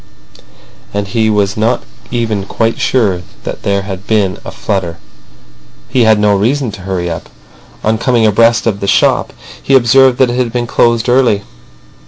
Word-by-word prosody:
And 100 Hz, -1 st, -2 dB
he 110 Hz, +1 st, +1 dB
was 100 Hz, -2 st, +1 dB
not 115 Hz, +3 st, 0 dB, 0.3 s
even 110 Hz, -5 st, -2 dB
quite 115 Hz, 0 st, -1 dB
sure 100 Hz, -9 st, +1 dB, 0.2 s
that -, -, -6 dB
there 100 Hz, -1 st, -1 dB
had 95 Hz, -1 st, -7 dB
been 100 Hz, -5 st, 0 dB
a -, -, -7 dB
flutter. 90 Hz, -5 st, -3 dB, 0.9 s
He 125 Hz, -2 st, +2 dB
had 110 Hz, -1 st, +5 dB
no 105 Hz, -1 st, +2 dB
reason 120 Hz, +5 st, 0 dB
to 100 Hz, -, -10 dB
hurry 90 Hz, -2 st, -3 dB
up. 80 Hz, -1 st, -6 dB, 0.5 s
On 110 Hz, +1 st, +1 dB
coming 120 Hz, -3 st, +2 dB
abreast 115 Hz, +1 st, +3 dB
of 105 Hz, -4 st, 0 dB
the 100 Hz, -, -3 dB
shop -, -, +2 dB, 0.3 s
he 135 Hz, -, +2 dB
observed 130 Hz, +1 st, +4 dB
that 130 Hz, -2 st, +3 dB
it 120 Hz, -, -3 dB
had 125 Hz, -2 st, 0 dB
been 120 Hz, 0 st, -2 dB
closed 115 Hz, 0 st, +1 dB
early. 120 Hz, -5 st, +2 dB
110 Hz, 170 wpm, -13 LUFS, 100-120 Hz, 0.9 s, had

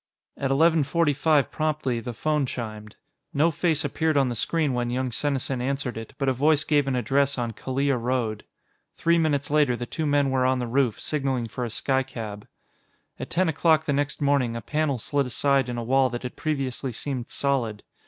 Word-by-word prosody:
At 135 Hz, -, -2 dB
eleven 160 Hz, +4 st, +4 dB
forty 145 Hz, +2 st, +2 dB
five 150 Hz, 0 st, +2 dB
promptly, 150 Hz, -6 st, -1 dB
the 120 Hz, 0 st, -6 dB
phone 150 Hz, +2 st, 0 dB
chimed. 110 Hz, -3 st, -6 dB, 0.4 s
No 155 Hz, +4 st, +4 dB
face 160 Hz, -1 st, +1 dB
appeared 155 Hz, +2 st, 0 dB
on 135 Hz, -2 st, +3 dB
the 120 Hz, -, -3 dB
screen 150 Hz, +4 st, 0 dB
when 120 Hz, -1 st, -1 dB
young 125 Hz, +1 st, -1 dB
Senesin 135 Hz, -1 st, -1 dB
answered 135 Hz, -1 st, -2 dB
it, 115 Hz, 0 st, -8 dB
but 135 Hz, -, -1 dB
a 130 Hz, -, +3 dB
voice 145 Hz, +4 st, +3 dB
gave 145 Hz, -3 st, +2 dB
an 135 Hz, -, 0 dB
address 135 Hz, +4 st, +1 dB
on 120 Hz, -2 st, -2 dB
Kalia 135 Hz, +4 st, -1 dB
Road. 115 Hz, -3 st, -1 dB, 0.5 s
Three 170 Hz, 0 st, +3 dB
minutes 145 Hz, -2 st, 0 dB
later, 145 Hz, -5 st, +3 dB
the 120 Hz, -, -4 dB
two 155 Hz, +5 st, -3 dB
men 145 Hz, -1 st, +2 dB
were 130 Hz, -1 st, +2 dB
on 130 Hz, 0 st, +2 dB
the 125 Hz, -, -2 dB
roof, 125 Hz, -1 st, +1 dB
signaling 135 Hz, -6 st, -1 dB
for 125 Hz, -, -4 dB
a -, -, -4 dB
skycab. 115 Hz, -5 st, -2 dB, 0.7 s
At -, -, -5 dB
ten 185 Hz, +1 st, +1 dB
o'clock 160 Hz, 0 st, +3 dB
the 145 Hz, -, 0 dB
next 145 Hz, +1 st, -1 dB
morning, 140 Hz, -5 st, +2 dB
a 115 Hz, -, -4 dB
panel 150 Hz, +1 st, 0 dB
slid 140 Hz, +4 st, -1 dB
aside 135 Hz, 0 st, +1 dB
in 120 Hz, -, -3 dB
a 120 Hz, -, -3 dB
wall 130 Hz, +2 st, +3 dB
that 120 Hz, +1 st, -5 dB
had 125 Hz, -, -6 dB
previously 135 Hz, -4 st, -2 dB
seemed 125 Hz, 0 st, -4 dB
solid. 120 Hz, -7 st, -1 dB
135 Hz, 200 wpm, -25 LUFS, 125-145 Hz, 0.7 s, eleven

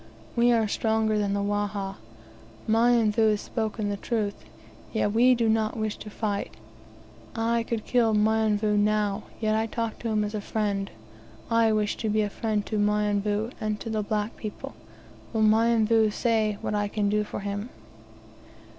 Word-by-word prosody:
We 240 Hz, +1 st, +4 dB
are 225 Hz, -2 st, +3 dB
stronger 220 Hz, 0 st, +1 dB
than 200 Hz, -1 st, 0 dB
the 200 Hz, -, 0 dB
Wahha. 205 Hz, -1 st, -2 dB, 0.7 s
Mionvu 225 Hz, -1 st, +3 dB
has 210 Hz, -1 st, 0 dB
spoken 220 Hz, -2 st, -3 dB
the 200 Hz, -, -2 dB
truth, 210 Hz, -2 st, -1 dB, 0.6 s
yet 215 Hz, -2 st, 0 dB
we 245 Hz, +4 st, +5 dB
do 230 Hz, -1 st, +1 dB
not 220 Hz, 0 st, +1 dB
wish 215 Hz, -1 st, -2 dB
to 210 Hz, -, -9 dB
fight. 205 Hz, -1 st, -3 dB, 0.8 s
I 230 Hz, +1 st, +1 dB
could 230 Hz, -1 st, -3 dB
kill 230 Hz, -3 st, +2 dB
Mionvu 210 Hz, -1 st, +2 dB
now, 210 Hz, 0 st, +1 dB
yet 215 Hz, -1 st, +1 dB
I 220 Hz, +1 st, 0 dB
talk 230 Hz, 0 st, -3 dB
to 235 Hz, -, -4 dB
him 215 Hz, -1 st, +1 dB
as 210 Hz, -, -3 dB
to 215 Hz, -, -3 dB
a -, -, -7 dB
friend. 200 Hz, -2 st, -2 dB, 0.6 s
I 230 Hz, -1 st, +4 dB
wish 210 Hz, -1 st, 0 dB
to 220 Hz, -, -2 dB
be 215 Hz, 0 st, +2 dB
a 205 Hz, -, -3 dB
friend 215 Hz, -2 st, -1 dB
to 215 Hz, -, -2 dB
Mionvu, 210 Hz, +1 st, +1 dB
and 215 Hz, -1 st, -2 dB
to 225 Hz, -1 st, -4 dB
all 215 Hz, -, +1 dB
black 210 Hz, +1 st, -2 dB
people. 215 Hz, -2 st, -7 dB, 0.6 s
Will 220 Hz, -1 st, +2 dB
Mionvu 225 Hz, 0 st, +4 dB
say 215 Hz, -1 st, 0 dB
what -, -, -2 dB
I 205 Hz, 0 st, 0 dB
can 205 Hz, 0 st, -1 dB
do 210 Hz, +1 st, +1 dB
for 205 Hz, -, -6 dB
him?" 205 Hz, +3 st, -4 dB
215 Hz, 170 wpm, -26 LUFS, 205-225 Hz, 0.8 s, we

